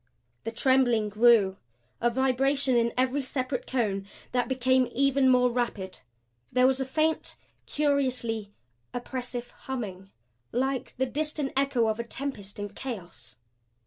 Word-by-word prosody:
The 225 - -2
trembling 240 -3 +3
grew; 210 -3 +5 0.4
a 240 - +4
vibration 265 +2 +2
in 235 0 +3
every 260 +2 +2
separate 255 -1 -3
cone 200 -6 -1 0.2
that 250 -1 +1
became 260 -1 +2
even 275 0 +3
more 250 -1 +4
rapid. 225 -6 -2 0.5
There 250 +1 +4
was 265 0 +3
a 265 - 0
faint, 310 +4 0 0.3
curiously 255 -7 0 0.4
oppressive 245 -1 -4
humming 195 -8 -6 0.4
like 265 +1 -1
the 260 - +2
distant 295 +1 -2
echo 275 -4 +2
of 220 +1 -1
a - - -1
tempest 235 -5 -5
in 205 0 -4
chaos. 205 -5 -8
250 Hz, 130 wpm, -28 LUFS, 230-265 Hz, 0.5 s, grew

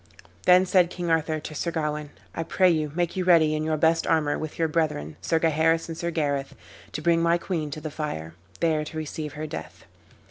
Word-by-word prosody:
Then 180 +1 +7
said 180 -2 +4
King 175 -2 -3
Arthur 160 -1 +1
to 155 - -8
Sir 170 - -2
Gawain, 150 -2 -2 0.2
"I - - -3
pray 180 +2 +3
you 155 -3 0
make 175 +1 0
you 185 - 0
ready, 165 -4 +5
in 155 0 -1
your 155 0 0
best 160 +2 +2
armor, 150 -3 +2
with 155 -1 -5
your 165 - +2
brethren, 150 - -1
Sir 165 - +1
Gaheris 165 0 +2
and 165 - -4
Sir 170 +1 -3
Gareth, 145 -4 -1 0.4
to 155 - -4
bring 170 -1 +3
my 170 +1 +3
queen 170 -4 -3
to 145 - -6
the 155 - -5
fire, 80 - -4 0.3
there 155 -2 +2
to 155 +1 -7
receive 155 -1 -5
her 155 +1 -5
death." 155 - -8
160 Hz, 215 wpm, -26 LUFS, 150-170 Hz, 0.4 s, Then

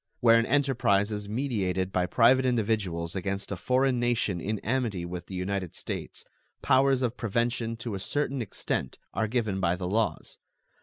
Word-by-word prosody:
Where 115 -1 +6
an 115 - 0
enterprise 120 -8 +2
is 105 -1 -4
meditated 100 -7 -1
by 90 -1 +1
private 125 +7 +5
individuals 105 -9 0
against 100 +2 -3
a - - -1
foreign 125 +6 +1
nation 115 -7 0
in 105 +4 -2
amity 115 -7 -1
with 90 0 -6
the 95 - -7
United 90 -1 -3
States, - - -6 0.4
powers 135 -1 +4
of 120 -1 -1
prevention 115 0 -1
to 115 -1 -5
a 95 - -3
certain 140 +5 -1
extent 110 - -3 0.2
are 110 - 0
given 110 -4 -1
by 85 -1 +2
the 90 0 -4
laws. 110 +4 -1
110 Hz, 165 wpm, -28 LUFS, 95-125 Hz, 0.4 s, Where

